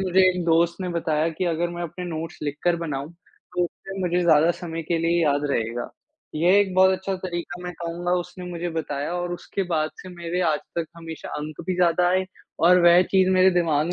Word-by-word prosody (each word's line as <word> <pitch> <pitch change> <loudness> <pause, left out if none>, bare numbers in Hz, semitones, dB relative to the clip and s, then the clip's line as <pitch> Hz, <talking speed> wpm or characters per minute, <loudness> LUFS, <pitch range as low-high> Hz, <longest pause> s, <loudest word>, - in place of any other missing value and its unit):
मुझे 190 0 +3
एक 180 -2 -1
दोस्त 170 +1 +3
ने 180 - -2
बताया 165 -2 0
कि 165 +3 -3
अगर 170 0 0
मैं 175 0 -5
अपने 180 +2 -6
नोट्स 165 -1 -5
लिखकर 150 +4 0
बनाऊँ, 150 -2 -4 0.4
तो 175 0 +2
फिर 195 +3 -10
मुझे 180 -1 +1
ज़्यादा 160 -1 +5
समय 165 -2 -5
के 165 +1 -1
लिए 170 +1 +2
याद 145 -1 +2
रहेगा। 115 -1 -2 0.4
ये 175 +6 +4
एक 190 -2 -1
बहुत 190 0 +6
अच्छा 190 +1 -2
तरीका 175 -1 -5
मैं 180 - -4
कहूँगा 170 +1 -2
उसने 180 +1 -9
मुझे 175 0 -3
बताया 150 -1 -3
और 175 0 -2
उसके 195 +2 -4
बाद 155 -1 +1
से 185 - -10
मेरे 175 0 -4
आज 150 - 0 0.2
तक 165 - -1
हमेशा 165 -1 -8
अंक 155 +1 -6
भी 185 - 0
ज़्यादा 175 0 +3
आए 185 +1 +2 0.4
और 180 +1 +7
वह 175 +1 +7
चीज़ 190 -1 +4
मेरे 185 0 +5
दिमाग 170 -2 +1
170 Hz, 205 wpm, -24 LUFS, 160-180 Hz, 0.4 s, और